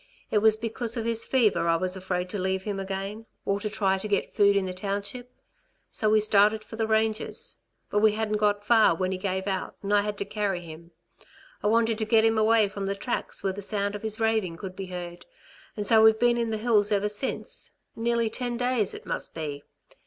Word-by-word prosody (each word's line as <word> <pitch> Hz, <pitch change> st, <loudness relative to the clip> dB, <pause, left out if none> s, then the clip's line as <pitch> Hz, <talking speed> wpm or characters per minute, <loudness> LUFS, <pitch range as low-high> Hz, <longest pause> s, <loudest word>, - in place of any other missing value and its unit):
It 210 Hz, -, +3 dB
was 220 Hz, 0 st, +5 dB
because 230 Hz, +1 st, -3 dB
of 225 Hz, -, -2 dB
his 230 Hz, -1 st, +1 dB
fever 220 Hz, -9 st, +2 dB
I 165 Hz, -, +4 dB
was 185 Hz, +2 st, 0 dB
afraid 185 Hz, -1 st, -3 dB
to 205 Hz, -, -3 dB
leave 190 Hz, 0 st, -1 dB
him 200 Hz, -1 st, -3 dB
again, 195 Hz, +3 st, -5 dB, 0.2 s
or 200 Hz, 0 st, 0 dB
to 210 Hz, -, -3 dB
try 195 Hz, -2 st, 0 dB
to 215 Hz, -, -5 dB
get 200 Hz, -1 st, -1 dB
food 200 Hz, -1 st, +4 dB
in 200 Hz, -1 st, +1 dB
the 185 Hz, -, -4 dB
township. 200 Hz, +6 st, -4 dB, 0.6 s
So 215 Hz, -, +1 dB
we 215 Hz, 0 st, +5 dB
started 215 Hz, 0 st, +4 dB
for 220 Hz, -, -10 dB
the 225 Hz, -1 st, -1 dB
ranges. 220 Hz, 0 st, -1 dB, 0.3 s
But 205 Hz, -, +2 dB
we 215 Hz, 0 st, +4 dB
hadn't 215 Hz, -1 st, -1 dB
gone 205 Hz, -1 st, +1 dB
far 215 Hz, -4 st, +4 dB
when 185 Hz, +2 st, -1 dB
he 185 Hz, -, -3 dB
gave 190 Hz, -1 st, -2 dB
out 190 Hz, -2 st, -3 dB
and 200 Hz, +1 st, -1 dB
I 205 Hz, -, +5 dB
had 210 Hz, 0 st, -4 dB
to 200 Hz, -, -3 dB
carry 200 Hz, -3 st, -2 dB
him. 165 Hz, 0 st, -11 dB, 0.7 s
I -, -, 0 dB
wanted 225 Hz, 0 st, +2 dB
to 220 Hz, -, 0 dB
get 220 Hz, 0 st, +4 dB
him 225 Hz, -1 st, +3 dB
away 220 Hz, -1 st, +4 dB
from 200 Hz, 0 st, -5 dB
the 195 Hz, -, -1 dB
tracks 235 Hz, +5 st, -4 dB
where 195 Hz, -, 0 dB
the 205 Hz, -, -7 dB
sound 200 Hz, 0 st, -1 dB
of 205 Hz, -, -6 dB
his 220 Hz, 0 st, -2 dB
raving 220 Hz, -7 st, 0 dB
could 185 Hz, -1 st, -7 dB
be 190 Hz, 0 st, -6 dB
heard, 175 Hz, -1 st, -7 dB, 0.5 s
and 210 Hz, -, -2 dB
so 220 Hz, +1 st, +6 dB
we've 220 Hz, 0 st, +6 dB
been 240 Hz, +1 st, +3 dB
in 230 Hz, -1 st, -1 dB
the 220 Hz, -, -1 dB
hills 215 Hz, -2 st, +2 dB
ever 205 Hz, 0 st, +2 dB
since 210 Hz, +6 st, -4 dB, 0.2 s
nearly 235 Hz, 0 st, 0 dB
ten 240 Hz, +1 st, -3 dB
days 245 Hz, -5 st, 0 dB
it -, -, -10 dB
must -, -, -5 dB
be. 150 Hz, -3 st, -5 dB
210 Hz, 225 wpm, -26 LUFS, 195-220 Hz, 0.7 s, so